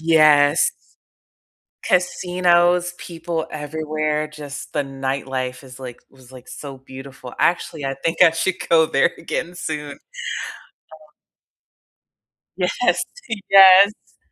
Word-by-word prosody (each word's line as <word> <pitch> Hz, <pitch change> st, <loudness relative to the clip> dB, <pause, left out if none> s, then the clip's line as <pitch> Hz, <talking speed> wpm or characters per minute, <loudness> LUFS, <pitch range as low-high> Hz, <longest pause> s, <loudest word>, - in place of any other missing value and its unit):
Yes. 155 Hz, -2 st, +4 dB, 1.1 s
Casinos, 180 Hz, -1 st, +2 dB
people 165 Hz, -1 st, -5 dB
everywhere, 155 Hz, 0 st, -3 dB
just 145 Hz, -2 st, -9 dB
the 145 Hz, -, 0 dB
nightlife 135 Hz, -1 st, -4 dB
is 130 Hz, 0 st, -13 dB
like 125 Hz, -2 st, -9 dB
was, 130 Hz, -1 st, -19 dB
like, 125 Hz, -1 st, -14 dB
so 140 Hz, -2 st, -9 dB
beautiful, 130 Hz, -1 st, -11 dB
actually, 165 Hz, -3 st, 0 dB
I 135 Hz, 0 st, -2 dB
think 165 Hz, -, -1 dB
I 165 Hz, -, +7 dB
should 175 Hz, +3 st, -1 dB
go 160 Hz, -1 st, +4 dB
there 140 Hz, -, +2 dB
again 170 Hz, +1 st, -5 dB
soon. 150 Hz, -4 st, -5 dB
Uh. -, -, -18 dB, 2.4 s
Yes, 180 Hz, +1 st, 0 dB, 0.8 s
yes! 195 Hz, +2 st, +6 dB
155 Hz, 105 wpm, -20 LUFS, 135-175 Hz, 2.4 s, I